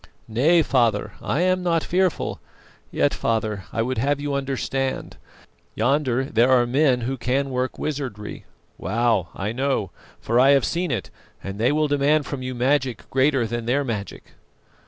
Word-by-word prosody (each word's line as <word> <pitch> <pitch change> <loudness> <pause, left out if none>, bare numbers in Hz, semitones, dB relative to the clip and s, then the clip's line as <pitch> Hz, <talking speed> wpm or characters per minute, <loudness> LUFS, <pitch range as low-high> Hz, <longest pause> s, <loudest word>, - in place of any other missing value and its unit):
"Nay, 150 +10 +3
father, 120 -7 +1
I 150 - -1
am 185 0 +2
not 170 -2 +1
fearful; 185 -2 0 0.5
yet, - - +1
father, 110 -4 -1
I 115 - 0
would 125 -1 -2
have 140 +3 +1
you 145 0 -3
understand. 135 -1 -2 0.6
Yonder 135 -2 +1
there 120 -1 +2
are 125 -2 +5
men 130 0 +2
who 130 +3 -2
can 135 +3 -1
work 130 0 -2
wizardry. 130 -9 -5 0.3
Wow! 115 -6 +1
I 100 +2 -3
know, 130 -6 -1 0.3
for 115 +2 +1
I 135 +2 +6
have 135 - 0
seen 175 +1 -1
it, 115 -9 -3 0.3
and 100 +1 -6
they 120 +4 +3
will 155 +1 +2
demand 145 +1 +2
from 140 -2 -5
you 130 0 -4
magic 130 0 0
greater 135 -2 +2
than 115 +1 -4
their 140 +4 +2
magic." 110 -6 -5
130 Hz, 160 wpm, -23 LUFS, 115-145 Hz, 0.6 s, I